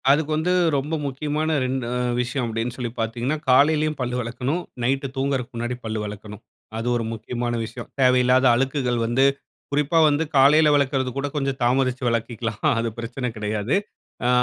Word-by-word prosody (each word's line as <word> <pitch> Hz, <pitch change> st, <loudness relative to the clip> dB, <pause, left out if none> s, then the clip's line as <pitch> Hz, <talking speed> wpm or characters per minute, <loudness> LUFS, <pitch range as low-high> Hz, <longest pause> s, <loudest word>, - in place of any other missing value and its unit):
அதுக்கு 150 Hz, +2 st, +3 dB
வந்து 165 Hz, +4 st, +1 dB, 0.2 s
ரொம்ப 145 Hz, +4 st, -3 dB
முக்கியமான 150 Hz, +3 st, -1 dB
2 130 Hz, -1 st, -2 dB, 0.4 s
விஷயம் 125 Hz, +1 st, -2 dB
அப்படின்னு 115 Hz, +2 st, -3 dB
சொல்லி 120 Hz, -3 st, -3 dB
பார்த்தீங்கன்னா, 120 Hz, +6 st, -1 dB
காலையிலேயும் 150 Hz, +3 st, +4 dB
பல்லு 125 Hz, -1 st, -2 dB
விலக்கணும், 125 Hz, +8 st, -2 dB, 0.2 s
நைட்டு 135 Hz, +3 st, 0 dB
தூங்குறதுக்கு 135 Hz, -2 st, -2 dB
முன்னாடி 120 Hz, +1 st, -2 dB
பல்லு 110 Hz, 0 st, -2 dB
விலக்கணும். 105 Hz, 0 st, -8 dB, 0.4 s
அது 115 Hz, +2 st, -3 dB
ஒரு 120 Hz, -, -1 dB
முக்கியமான 120 Hz, +2 st, -3 dB
விஷயம். 115 Hz, -, -8 dB
தேவையில்லாத 125 Hz, 0 st, +4 dB
அழுக்குகள் 130 Hz, -1 st, 0 dB
வந்து 120 Hz, +4 st, +2 dB, 0.5 s
குறிப்பா 150 Hz, +3 st, +2 dB
வந்து 145 Hz, +2 st, +1 dB
காலையில 150 Hz, +3 st, +6 dB
விலக்கறது 135 Hz, -2 st, +1 dB
கூட 140 Hz, +1 st, -1 dB
கொஞ்சம் 135 Hz, -1 st, -1 dB
தாமதித்து 130 Hz, +1 st, +1 dB
விலக்கிலாம், 115 Hz, -1 st, -3 dB
அது 115 Hz, 0 st, -1 dB
பிரச்சனை 120 Hz, +2 st, -4 dB
கிடையாது. 105 Hz, -, -1 dB, 0.5 s
அ -, -, +3 dB
130 Hz, 150 wpm, -23 LUFS, 120-140 Hz, 0.5 s, காலையில